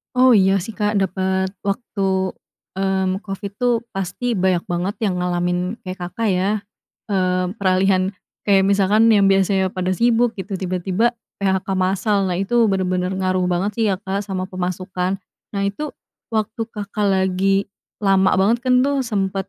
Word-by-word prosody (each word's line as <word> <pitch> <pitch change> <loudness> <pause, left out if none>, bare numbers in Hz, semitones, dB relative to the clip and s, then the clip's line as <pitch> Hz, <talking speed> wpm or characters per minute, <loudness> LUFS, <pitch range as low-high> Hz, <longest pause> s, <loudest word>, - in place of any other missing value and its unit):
Oh, 255 -2 +6
iya, 195 0 +4
sih, 215 +5 -7
Kak, 210 -1 +1
dapet 190 0 0 0.2
waktu, 200 -1 -2 0.7
mmm, 190 +1 0
covid, 200 0 -5
tuh, 245 -1 +1 0.2
pasti 195 +5 -2
banyak 185 -1 +2
banget 175 +3 -1 0.2
yang 185 - -1
ngalamin 180 +3 -1
kayak 185 0 -7
Kakak, 220 +5 -2
ya. 190 +1 +1 0.6
Mmm, 185 -1 0
peralihan 190 0 +2 0.3
kayak 195 -2 +4
misalkan 200 +3 +4
yang 205 -3 +5
biasanya 195 -1 +2
pada 185 0 -2
sibuk 235 0 +2
gitu, 195 +1 -6
tiba-tiba 185 +6 0 0.2
PHK 190 -1 +1
massal. 190 +1 +1
Nah, 180 - -1
itu, 215 +5 +1
bener-bener 185 -2 0
ngaruh 185 -1 0
banget 180 +3 0
sih - - +3
ya, 195 - +1
Kak, 195 +1 -3
sama 190 -2 -3
pemasukan. 185 0 -3 0.3
Nah, 200 -1 -3
itu, 200 +10 -2 0.4
waktu 220 0 -2
Kakak 210 -1 -3
lagi 190 +1 +2 0.3
lama 195 -2 +3
banget 220 +5 +3
kan 255 0 +3
tuh, 280 0 +1
sempet, 195 -5 -2
195 Hz, 150 wpm, -20 LUFS, 185-210 Hz, 0.7 s, Oh